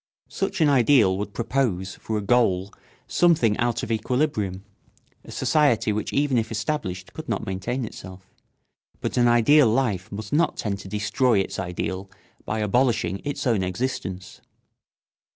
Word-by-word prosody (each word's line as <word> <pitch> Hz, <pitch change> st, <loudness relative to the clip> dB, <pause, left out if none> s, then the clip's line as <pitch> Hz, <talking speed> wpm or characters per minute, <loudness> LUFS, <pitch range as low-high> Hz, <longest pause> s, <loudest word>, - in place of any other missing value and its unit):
Such 195 Hz, -3 st, -2 dB
an 155 Hz, -, +5 dB
ideal 125 Hz, -7 st, +4 dB
would 105 Hz, 0 st, -4 dB
propose 115 Hz, -6 st, -1 dB
for 110 Hz, -, -4 dB
a 105 Hz, -, -3 dB
goal 100 Hz, -4 st, +2 dB, 0.3 s
something 155 Hz, -12 st, +3 dB
out 120 Hz, -1 st, 0 dB
of -, -, -4 dB
equilibrium, 110 Hz, -5 st, -1 dB, 0.6 s
a -, -, -15 dB
society 140 Hz, -8 st, +2 dB
which 105 Hz, -, -3 dB
even 140 Hz, -3 st, +2 dB
if 110 Hz, 0 st, -4 dB
established 110 Hz, -6 st, -3 dB
could -, -, -8 dB
not -, -, -2 dB
maintain 115 Hz, +7 st, -3 dB
itself; 95 Hz, -3 st, -11 dB, 0.7 s
but -, -, -3 dB
an 120 Hz, -1 st, +4 dB
ideal 120 Hz, +4 st, +5 dB
life 110 Hz, -6 st, 0 dB
must 105 Hz, +1 st, -6 dB
not 165 Hz, +3 st, +2 dB
tend 100 Hz, -2 st, -3 dB
to 95 Hz, -, -10 dB
destroy 110 Hz, +4 st, +1 dB
its 95 Hz, -, -2 dB
ideal 95 Hz, +1 st, -4 dB, 0.4 s
by 110 Hz, 0 st, -2 dB
abolishing 105 Hz, -4 st, +1 dB
its 145 Hz, 0 st, -4 dB
own 115 Hz, -6 st, +2 dB
existence. 95 Hz, -2 st, -4 dB
110 Hz, 150 wpm, -24 LUFS, 95-130 Hz, 0.7 s, an